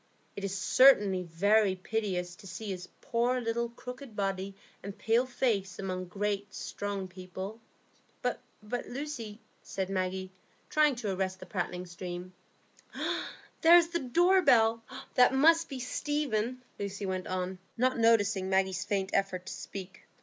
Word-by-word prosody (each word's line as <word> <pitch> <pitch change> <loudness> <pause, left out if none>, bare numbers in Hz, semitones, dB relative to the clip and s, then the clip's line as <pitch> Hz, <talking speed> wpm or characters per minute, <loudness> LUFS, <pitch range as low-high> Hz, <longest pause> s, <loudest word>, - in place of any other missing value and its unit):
It 200 - -6
is 195 0 -2
certainly 205 -4 +5
very 195 +4 +3
piteous 185 -3 -2
to 195 - -12
see 210 +2 -5
his 180 -1 -6
poor 240 +2 +1
little 235 0 -1
crooked 250 0 -9
body 195 -1 -2 0.3
and 200 +1 -7
pale 230 +4 +2
face 210 -7 0
among 185 -1 -3
great, 200 +1 -3
strong 200 -2 -4
people." 185 +4 -7 0.6
"But, - - -1 0.2
Lucy——" 245 -1 -5 0.2
said 190 0 -4
Maggie, 185 0 -2 0.4
trying 300 -3 +4
to 215 -5 -2
arrest 185 0 -2
the - - -9
prattling 180 -1 -3
stream. 180 +1 -7 0.6
"Ah, - - -2 0.3
there 335 +2 +9
is 335 -1 +4
the 340 0 -1
door 350 +8 +4
bell. 225 -6 +4 0.3
That 250 +1 +5
must 325 +4 +5
be 270 - -5
Stephen," 255 -3 -1 0.2
Lucy 200 0 -4
went 185 -1 -2
on, 185 0 -3 0.2
not 255 +1 +2
noticing 210 -4 +3
Maggie's 190 -1 +1
faint 195 -1 -1
effort 185 -2 0
to - - -5
speak. 190 -1 -8
205 Hz, 145 wpm, -30 LUFS, 190-245 Hz, 0.6 s, there